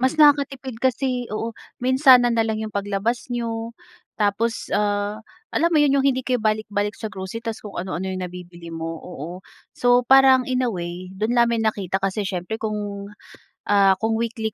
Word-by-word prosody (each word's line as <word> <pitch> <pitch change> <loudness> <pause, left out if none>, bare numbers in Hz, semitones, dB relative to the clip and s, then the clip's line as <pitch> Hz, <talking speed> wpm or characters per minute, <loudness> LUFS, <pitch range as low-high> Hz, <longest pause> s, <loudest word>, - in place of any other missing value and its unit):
Mas 260 +5 +1
nakakatipid 275 -5 +3
kasi 255 -1 0
oo. 225 +1 -3 0.3
Minsanan 255 -2 +6
na 225 - +3
lang 220 0 -2
yung 215 -1 -5
paglabas 205 +5 -2
n'yo, 230 -1 -3 0.5
tapos, 215 +3 0
ah, 205 0 0 0.3
alam 335 +2 +1
mo 305 - +5
yun, 280 -1 +4
yung 270 - +2
hindi 260 -1 +2
kayo 255 0 0
balik-balik 210 -1 -1
sa 220 - -5
grocery 190 +4 -6
tapos 225 -1 -5
kung 205 - -8
ano-ano 185 0 -4
yung 185 0 -4
nabibili 175 -1 -9
mo, 165 0 -5
oo. 175 +2 -8 0.3
So, 245 0 +3
parang 265 -1 +6
in 255 -1 0
a 250 - +1
way, 175 -1 -5
do'n 220 +4 0
namin 235 -1 +3
nakita 200 -4 0
kasi 195 +2 -1
siyempre 190 +3 -4
kung, 205 -2 -4 0.6
ah, 195 -2 +4
kung 220 +1 0
weekly 225 -2 -2
220 Hz, 175 wpm, -22 LUFS, 195-245 Hz, 0.6 s, Minsanan